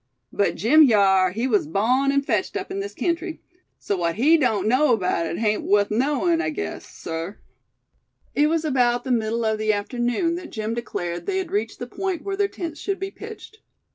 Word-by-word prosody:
"But 200 - +1
Jim 295 +7 +6
hyar, 195 -4 +4
he 225 +7 -2
was 210 - +1
bawn 250 - +2
an' 280 0 +1
fetched 215 -8 -1
up - - -6
in 195 - -3
this 200 +1 -5
kentry; 335 +3 -2 0.4
so 200 - -2
what 170 -2 -1
he 290 +9 +5
doan't 220 - +1
know 255 +1 +4
'baout 180 -3 0
hit 165 +2 -4
hain't 215 0 +1
wuth 205 0 +2
knowin', 295 +8 +1
I 340 - -1
guess, 360 +6 -5
sir." 165 +5 -6 1.0
It 295 +1 +3
was 325 0 0
about 245 -4 +2
the 260 - -3
middle 230 -1 0
of 220 -1 0
the 215 0 +2
afternoon 245 - -1
that 360 - -8
Jim 220 0 -3
declared 175 -7 -4
they 390 -1 0
had 370 -2 -3
reached 410 +2 -2
the - - -5
point 380 -4 -3
where 395 -1 -3
their 400 0 +1
tents 335 -5 -6
should 395 -1 -3
be 390 +1 -4
pitched. 435 +1 -11
245 Hz, 200 wpm, -23 LUFS, 205-325 Hz, 1.0 s, Jim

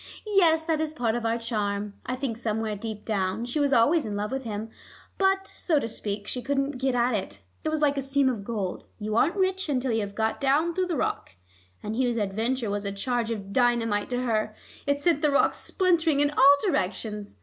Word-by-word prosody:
"Yes; 340 -6 +4
that 320 -2 0
is 310 0 -3
part 235 -6 0
of 235 -1 -1
our 225 +1 +1
charm. 210 -3 -2
I 255 - -1
think 255 -3 -3
somewhere 220 -2 -2
deep 210 0 -6
down 200 +1 -1
she 245 +5 -2
was 285 -1 +2
always 285 +7 +4
in 210 -2 -4
love 210 +2 -2
with 265 -1 -3
him, 220 0 -5 0.5
but, 385 0 +2
so 325 -4 0
to 255 - 0
speak, 205 -2 -4
she 250 - -2
couldn't 275 +1 -1
get 265 -1 +1
at 245 +1 +2
it. 100 - -3 0.2
It - - 0
was 310 -1 -1
like 285 -1 +3
a - - +1
seam 275 0 +2
of 235 -6 -1
gold: 200 -4 -4
you 215 0 -3
aren't 305 - +3
rich 380 -2 0
until 260 -2 0
you 225 - +1
have 200 -1 -5
got 220 +4 -1
down 295 +5 +2
through 370 +1 0
the 340 -4 -1
rock. 95 - -2 0.5
And 215 +1 -3
Hugh's 245 -1 +1
adventure 220 +3 -1
was 205 0 -2
a 200 - -2
charge 235 +3 -1
of 200 -3 -5
dynamite 235 -4 +2
to 250 0 -1
her; 215 -3 0 0.3
it 285 0 +2
sent 295 0 +2
the 300 - +3
rock 280 - +3
splintering 335 -6 +1
in 290 0 +3
all 280 0 +7
directions. 210 - -2
245 Hz, 220 wpm, -26 LUFS, 215-285 Hz, 0.5 s, all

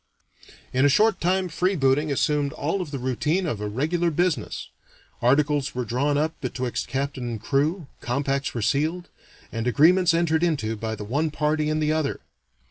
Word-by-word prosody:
In 130 +1 +3
a 145 - +6
short 210 +7 +3
time 185 +2 +1
freebooting 155 -5 +1
assumed 145 0 +1
all 165 +7 -2
of 175 - -5
the 140 - -4
routine 140 +8 0
of 115 -10 -3
a 105 - -2
regular 160 +10 0
business. 175 0 -1 0.5
Articles 145 +2 +2
were 125 -1 -2
drawn 140 +6 0
up 155 +2 0
betwixt 125 -2 -3
captain 135 -2 -3
and 115 -2 -4
crew, 150 - 0
compacts 135 +2 -1
were 115 - -1
sealed, 160 +8 0 0.4
and 115 +1 -3
agreements 170 +7 +4
entered 165 -1 +2
into 140 -11 0
by 110 +1 -4
the 105 - -7
one 145 +9 0
party 150 0 0
and 155 0 0
the 150 - +2
other. 155 -3 -1
145 Hz, 170 wpm, -24 LUFS, 130-160 Hz, 0.5 s, a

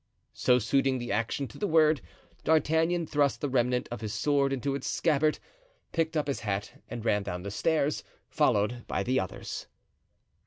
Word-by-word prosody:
So, 125 - +3
suiting 135 +3 +2
the 120 -3 -4
action 115 +6 -1
to - - -12
the 205 - 0
word, 155 -3 +4 0.4
D'Artagnan 160 +2 +2
thrust 145 -2 +1
the 145 - -1
remnant 125 -1 +1
of 120 - -5
his 110 -2 -3
sword 140 -2 +2
into 135 +1 -1
its 140 -1 -3
scabbard, 155 -2 +2 0.5
picked 165 -1 0
up 150 - +1
his 140 - -2
hat 100 -2 -4
and 120 -2 -6
ran 105 -2 +2
down 90 -3 -5
the 100 - -5
stairs, 155 +5 +1 0.2
followed 110 +4 +1
by 95 - -1
the 130 +5 +1
others. 95 -2 -5
135 Hz, 170 wpm, -29 LUFS, 115-155 Hz, 0.5 s, word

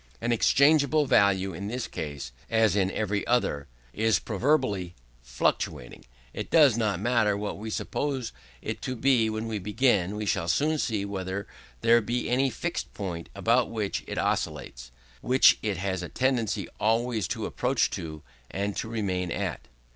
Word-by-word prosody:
As 120 - -1
exchangeable 140 +5 +4
value 95 -6 +3
in 100 +5 -5
this 125 +3 -3
case, 70 -4 -6 0.2
as 110 -4 +3
in 95 -2 +2
every 105 0 -1
other, 75 -13 0 0.3
is 110 -2 +2
proverbially 105 - 0 0.3
fluctuating, - - -2 0.3
it - - -5
does 150 -8 +6
not 105 -5 0
matter 110 -2 +2
what 100 -1 -4
we 110 +1 -5
suppose 130 +1 -2 0.3
it - - -4
to 130 - -3
be 120 -2 +3
when 110 +1 -3
we 110 -2 -3
begin; 105 -2 +1
we 105 0 -3
shall 85 - 0
soon 155 - +1
see 105 -6 -1
whether 95 0 -4 0.4
there 115 +1 +5
be 120 +3 -2
any 135 +2 +3
fixed 170 +9 -4
point 90 -5 -5
about 115 +5 +2
which 105 -3 -3
it - - -5
oscillates - - -2 0.3
which 130 +1 +5
it 105 -4 -1
has 95 -1 -2
a 90 - -6
tendency 125 -5 0
always 115 -2 +1
to - - -3
approach - - 0
to, 80 -2 -6 0.3
and 100 +1 -3
to 110 - -3
remain 95 -5 -2
at. - - -3
110 Hz, 160 wpm, -27 LUFS, 95-120 Hz, 0.4 s, does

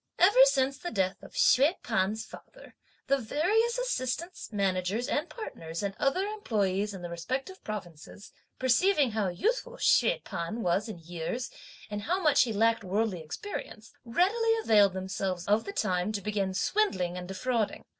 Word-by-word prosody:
Ever 415 +8 +7
since 275 - +1
the 350 - -4
death 190 - -1
of - - -13
Hsüeh 285 +8 +4
P'an's 220 -1 0
father, - - -14 0.3
the 275 0 +2
various 415 - +1
assistants, 340 - -3
managers 195 +2 0
and 295 - -1
partners, 165 - -6
and 200 -1 -2
other 365 +8 +1
employes 210 - -1
in 180 - -9
the 175 - -5
respective 260 - -4
provinces, 200 -1 -8 0.3
perceiving 275 - +3
how 215 -2 0
youthful 470 - -1
Hsüeh - - +3
P'an 195 +8 -4
was 190 +5 +1
in 210 - -6
years, 170 +8 -5 0.4
and 205 0 -3
how 355 - 0
much 305 -6 +4
he 235 - -3
lacked 225 +2 +2
worldly 195 -1 -1
experience, 215 - -7
readily 415 - +2
availed 205 -3 +5
themselves 190 -1 -3
of 210 +2 +2
the - - -4
time 185 - 0
to 205 - -2
begin 195 -2 -2
swindling 185 - +1
and 180 0 -6
defrauding. 220 +3 -2
220 Hz, 155 wpm, -29 LUFS, -, 0.4 s, Ever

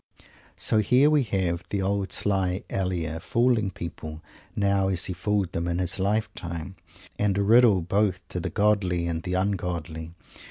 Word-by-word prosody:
So 110 - +1
here 125 +8 +4
we 150 -1 +4
have 90 -5 -1
the 100 -1 -1
old 100 0 -1
sly 95 -2 0
Elia, 85 -4 -2
fooling 115 +1 +2
people 80 -3 -7 0.3
now 100 -1 +2
as 95 -2 -1
he 90 - -3
fooled 95 0 -1
them 85 +1 -2
in 85 0 -1
his 90 +2 -1
lifetime, 95 -4 -2 0.4
and 100 -2 +1
a 100 - +2
riddle 110 -3 +5
both 95 +1 0
to 90 - -3
the - - -3
godly 100 -5 +1
and 85 -1 -2
the 90 +1 -3
ungodly. 85 -4 -2
95 Hz, 160 wpm, -26 LUFS, 85-105 Hz, 0.4 s, riddle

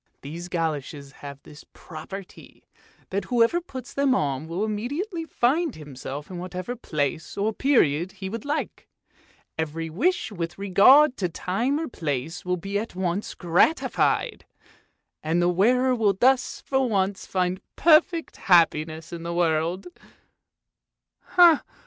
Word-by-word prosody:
These 165 +5 -7
goloshes 150 -4 -3
have 140 0 -11
this 150 0 -14
property, 180 +4 -10 0.5
that 195 0 -2
whoever 240 - +2
puts 260 -7 -9
them 275 -2 +2
on 140 - -1
will 175 +6 -2
immediately 295 - -3
find 300 +2 0
himself 145 +1 -8
in 180 - -6
whatever 185 +5 -5
place 155 - -3
or 210 +2 0
period 185 - +2
he 195 -1 -7
would 225 +3 -5
like; 295 +2 -4 0.7
every 160 +1 -3
wish 280 - 0
with 175 -3 -5
regard 250 +9 +5
to 180 -3 -1
time 230 - -1
or 325 - -3
place 160 - -4
will 180 0 -1
be 200 +3 -3
at 220 -3 -7
once 185 +2 -2
gratified, 175 - +1 0.8
and 160 +2 0
the 175 - +3
wearer 250 +8 +3
will 220 -5 +2
thus 260 +1 +2
for 265 -2 +1
once 195 -2 -1
find 185 0 -1
perfect 330 +1 +3
happiness 165 -4 +2
in 170 - -6
this 170 +1 -4
world! 170 +1 0
185 Hz, 130 wpm, -25 LUFS, 165-245 Hz, 0.8 s, regard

